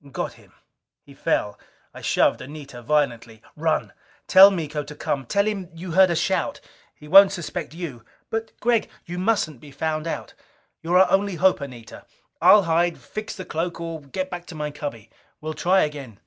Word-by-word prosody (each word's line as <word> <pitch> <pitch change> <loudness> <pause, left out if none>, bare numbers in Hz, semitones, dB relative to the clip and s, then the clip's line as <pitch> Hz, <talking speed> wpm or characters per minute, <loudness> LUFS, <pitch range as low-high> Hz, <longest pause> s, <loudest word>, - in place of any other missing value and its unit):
Got - - -3
him! - - -20 0.5
He - - -16
fell. 105 0 -1 0.3
I - - -11
shoved - - +2
Anita 140 -3 -9
violently. 120 -5 -1
"Run! - - -1 0.3
Tell 190 +1 +9
Miko 155 -6 -3
to 145 +1 -10
come 135 -4 -3
tell 200 +7 +2
him 200 -5 -3
you 175 +2 -7
heard 190 +2 +6
a 170 - 0
shout. - - 0 0.4
He 150 - -14
won't 195 +5 +8
suspect 170 -2 -5
you!" 150 -10 -7 0.3
"But, 225 0 -3
Gregg 235 -2 +1
" - - -35
"You 175 +1 -5
mustn't 185 - 0
be 150 - -12
found 155 +2 -3
out. - - -5 0.5
You're 175 +2 +2
our 190 - +5
only 195 -1 +2
hope, 185 -1 +3
Anita! 125 -5 -10 0.3
I'll 205 -1 +7
hide, 170 +1 +1
fix 215 0 -7
the 185 - -7
cloak, 170 0 -3
or 165 -2 -5
get 185 +7 -5
back 175 -1 -7
to 165 - -9
my 150 -1 -3
cubby. 115 -7 -7 0.3
We'll 155 +1 -5
try 180 +5 +3
again." 140 -8 -4
165 Hz, 185 wpm, -23 LUFS, 145-185 Hz, 0.5 s, Tell